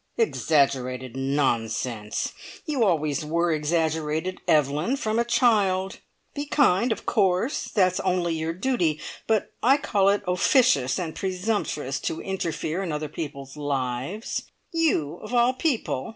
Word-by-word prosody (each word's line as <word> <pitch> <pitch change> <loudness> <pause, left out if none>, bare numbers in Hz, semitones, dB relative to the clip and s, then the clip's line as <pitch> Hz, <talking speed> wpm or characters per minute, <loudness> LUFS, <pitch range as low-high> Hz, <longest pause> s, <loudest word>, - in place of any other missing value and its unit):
"Exaggerated 130 - +1
nonsense! 120 -5 -1 0.3
You 290 -7 +1
always 155 -5 +1
were 170 +3 +1
exaggerated, 160 +2 -1
Evelyn, 150 - +2
from 220 -4 -1
a - - +3
child. 200 -6 +2 0.3
Be 290 0 -4
kind, 245 -6 +3
of - - -3
course; 200 +5 +1
that's 185 -3 +2
only 180 -2 0
your 160 0 -2
duty, 180 - 0 0.3
but 220 -2 +1
I 270 +4 +5
call 200 -8 +2
it 200 +1 +1
officious 180 - +3
and 165 -4 -3
presumptuous 185 - -2
to 160 - -3
interfere 170 -2 -3
in 180 -4 -3
other 150 0 -3
people's 140 -3 -7
lives. 140 - -3 0.3
You 225 - +1
of 225 +3 -5
all 240 +1 +4
people! 255 - -1
170 Hz, 130 wpm, -25 LUFS, 145-215 Hz, 0.3 s, I